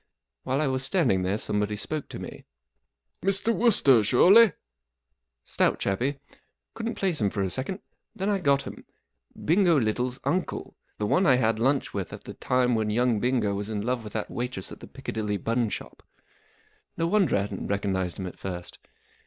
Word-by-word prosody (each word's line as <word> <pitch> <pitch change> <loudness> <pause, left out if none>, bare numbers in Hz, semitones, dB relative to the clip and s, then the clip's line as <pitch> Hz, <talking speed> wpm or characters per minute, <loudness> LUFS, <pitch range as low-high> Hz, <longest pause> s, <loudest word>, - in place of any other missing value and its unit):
While 135 +4 0
l 135 - +1
was 130 0 -1
standing 135 - +2
there 95 +3 0
some¬ 105 -1 -2
body 105 0 -1
spoke 135 +9 -4
to - - -7
me. - - -8 0.8
M 195 - +1
Mr. 200 +4 +1
Wooster, 140 - +5
surely? 190 - +7 0.5
" 65 - -56
Stout - - +3
chappie* 130 +9 -1 0.6
Couldn't 225 0 -4
place 180 - -1
him 100 - +3
for 100 0 -2
a 95 - -2
second. 160 +9 -4 0.3
Then 195 - -2
I 205 -1 +1
got 140 -5 +2
him* - - -9 0.6
Bingo 170 -2 +4
Little's 125 +3 -1
uncle, 175 +7 -2 0.2
the 105 - -1
one 180 - +3
I 130 - +6
had 115 -3 +1
lunch 135 +3 +1
with 100 -3 -4
at - - -9
the - - -8
time 125 -1 +1
w 115 -3 +2
f - - 0
hen - - -1
young 120 0 +2
Bingo 120 -4 +1
was 100 +1 -4
in 105 -2 -2
love 120 0 -1
with 105 - -9
that 110 - -3
waitress 120 -6 -4
at - - -10
the - - -11
Piccadilly 105 -2 -3
bun 115 +2 0
shop. - - -6 1.0
No 165 - +1
wonder 185 - +3
I - - +1
hadn't 100 - -5
recognized 95 -3 -1
him 95 - -4
at 90 - -8
first. 90 -2 -6
125 Hz, 195 wpm, -26 LUFS, 105-155 Hz, 1.0 s, surely